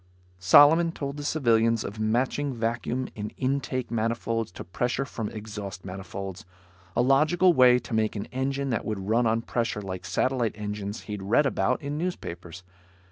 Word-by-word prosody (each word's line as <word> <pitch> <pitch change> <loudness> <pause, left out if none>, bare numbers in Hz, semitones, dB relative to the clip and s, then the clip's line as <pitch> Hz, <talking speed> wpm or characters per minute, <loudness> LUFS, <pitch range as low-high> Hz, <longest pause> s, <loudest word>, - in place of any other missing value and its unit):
Solomon 145 - +6
told 140 -2 -5
the 145 - -5
civilians 115 -6 +2
of 105 +2 -7
matching 125 +5 0
vacuum 120 +2 -2
in 105 0 -5
intake 130 -2 -2
manifolds 115 -1 -1
to - - -7
pressure 120 +9 -2
from 115 -6 -5
exhaust 105 -4 -7
manifolds. 95 +1 -6 0.5
A - - +3
logical 155 +7 +4
way 125 -3 +6
to 125 - -7
make 110 0 +1
an 100 - -3
engine 135 +1 -1
that 115 - -1
would 100 -3 -4
run 115 +1 +3
on 115 +1 +1
pressure, 115 -3 -1
like 95 -1 -6
satellite 125 -4 0
engines 105 0 -5
he'd 105 -2 -6
read 110 +9 +3
about 95 -2 0
in 145 +2 -3
newspapers. 90 - -5
115 Hz, 160 wpm, -26 LUFS, 105-135 Hz, 0.5 s, Solomon